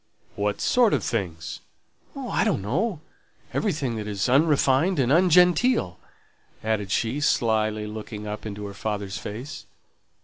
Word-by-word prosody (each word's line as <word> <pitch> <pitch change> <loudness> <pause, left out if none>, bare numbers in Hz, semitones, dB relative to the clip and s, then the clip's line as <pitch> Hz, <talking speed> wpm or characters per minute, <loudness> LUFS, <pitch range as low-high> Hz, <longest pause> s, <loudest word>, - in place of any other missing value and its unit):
"What 100 0 -1
sort 245 -4 +4
of - - -2
things?" 85 -8 -3 0.6
"Oh, - - -5
I - - +1
don't 95 - 0
know: 165 - -1 0.5
everything 145 - -1
that 105 -1 -5
is 100 0 -1
unrefined 145 +4 +3
and 130 -2 +2
ungenteel," 180 - +4 0.6
added 110 -3 -1
she, 115 +7 0
slily 110 -5 +1
looking 105 0 -7
up 105 0 -5
into 105 -1 -6
her 100 - -7
father's 100 -1 -4
face. 125 +8 -7
110 Hz, 135 wpm, -25 LUFS, 105-150 Hz, 0.6 s, sort